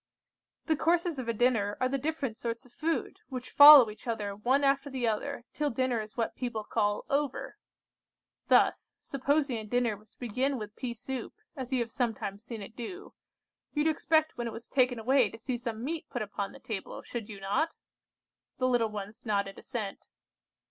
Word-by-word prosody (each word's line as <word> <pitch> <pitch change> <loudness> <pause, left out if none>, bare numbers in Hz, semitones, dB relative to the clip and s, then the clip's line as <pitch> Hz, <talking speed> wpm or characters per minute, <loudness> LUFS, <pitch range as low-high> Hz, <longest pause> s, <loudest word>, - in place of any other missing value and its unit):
The 320 - +2
courses 335 0 +1
of 250 - -4
a - - +2
dinner 220 -3 +2
are 255 - +2
the 275 +1 -1
different 285 -5 -2
sorts 235 +3 -4
of 250 - -19
food, 320 +5 -2
which 255 -2 -6
follow 285 -4 +11
each 215 - -14
other 210 -3 -2
one 255 +7 +2
after 275 +1 +2
the 260 -3 -1
other, 220 +2 -2
till 295 0 0
dinner 250 -2 0
is 215 +2 -10
what 230 - -1
people 240 -4 -3
call 205 0 0
'over.' 285 0 -2 0.9
Thus, - - +3
supposing 275 -1 0
a - - -6
dinner 235 0 +1
was 210 +1 -19
to - - -33
begin 255 +3 -1
with 210 -2 -7
pea 245 -3 -4
soup, 250 +1 -5 0.2
as 260 -3 -6
you 255 -2 +2
have 230 -1 -3
sometimes 220 -4 -2
seen 230 -4 -6
it 220 - -11
do, 360 - -7 0.6
you 295 - +1
would 320 - +4
expect 315 -2 +1
when 240 - -1
it 230 - -5
was 230 +1 -8
taken 250 -2 +2
away 245 0 +3
to 225 - -10
see 245 +3 -3
some 230 -2 -4
meat 320 +4 -4
put 245 -4 -2
upon 200 -1 -4
the - - -13
table, 215 -4 -6
should 230 -4 -6
you 205 -2 -8
not?" 200 +12 +1 0.9
The 255 - +1
little 240 -3 +2
ones 210 +1 -7
nodded 200 -3 -1
assent. 220 -7 -5
245 Hz, 195 wpm, -30 LUFS, 220-275 Hz, 0.9 s, follow